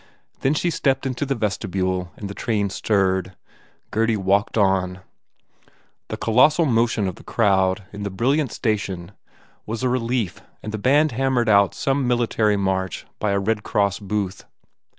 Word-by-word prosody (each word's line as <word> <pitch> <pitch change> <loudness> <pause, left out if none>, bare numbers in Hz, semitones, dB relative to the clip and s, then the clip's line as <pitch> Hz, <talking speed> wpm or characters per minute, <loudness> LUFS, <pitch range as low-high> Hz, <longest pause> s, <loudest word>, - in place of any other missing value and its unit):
Then 135 +3 +1
she 170 +3 0
stepped 135 -3 0
into 130 +1 -2
the 135 - 0
vestibule 95 -4 -2
and 100 - -6
the 100 - -6
train 105 -3 -1
stirred. 95 -3 0 0.6
Gurdy 115 0 +1
walked 100 +3 +1
on. 95 -2 +1 1.1
The - - -5
colossal 140 +9 +4
motion 115 -5 +1
of 90 - -5
the - - -14
crowd 95 -3 +2
in 105 - -7
the 100 - -2
brilliant 130 +7 0
station 100 -6 -2 0.6
was 115 +2 -4
a 130 - +2
relief 120 -6 -1 0.2
and 110 -1 -5
band 145 +5 +4
hammered 125 -1 +1
out 100 -2 +4
some 135 -1 0
military 115 -3 +2
march 95 -2 -2
by 105 - 0
a 100 - +1
Red 105 +2 0
Cross 100 -1 0
booth. 100 -2 -3
105 Hz, 150 wpm, -22 LUFS, 95-120 Hz, 1.1 s, colossal